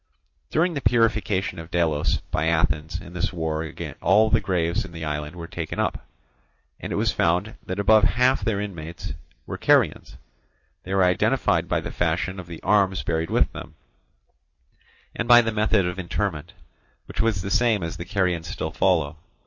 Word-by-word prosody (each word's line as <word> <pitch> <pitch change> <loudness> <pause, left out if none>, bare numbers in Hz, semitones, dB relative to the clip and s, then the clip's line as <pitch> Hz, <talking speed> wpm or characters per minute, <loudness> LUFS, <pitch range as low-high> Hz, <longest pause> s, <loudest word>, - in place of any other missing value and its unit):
During 170 +3 +1
the 140 - -3
purification 110 -7 +1
of 80 0 -9
Delos 80 -4 +1
by 80 - 0
Athens 80 +1 0
in 90 -2 -12
this 90 - -1
war 80 -3 -2 0.4
all 105 +5 +4
the - - +4
graves 90 -3 0
in 85 - -11
the 80 -1 -5
island 75 +2 -4
were 85 -1 -7
taken - - -5
up, - - -2 0.7
and - - -6
it - - -1
was - - +1
found 90 +6 +1
that 95 - -3
above 105 +1 +5
half 125 +4 +3
their 110 -4 0
inmates 85 -8 -6 0.3
were - - -6
Carians: - - +2 0.6
they 95 +1 -4
were 95 - +4
identified 90 -1 +2
by - - +1
the - - -6
fashion 90 +3 -1
of 90 - -9
the 85 -1 -9
arms 95 -2 +2
buried 80 +1 -1
with - - +2
them, - - -10 1.4
and 115 - -2
by 120 0 +9
the 115 -1 +1
method 105 -2 +2
of 90 +2 -3
interment, 85 -3 -3 0.5
which - - -3
was 110 -5 0
the 100 - -4
same 110 -2 +2
as 80 - -4
the 85 - -6
Carians 90 -4 -1
still 80 +1 -4
follow. 80 -4 +1
90 Hz, 175 wpm, -24 LUFS, 85-105 Hz, 1.4 s, by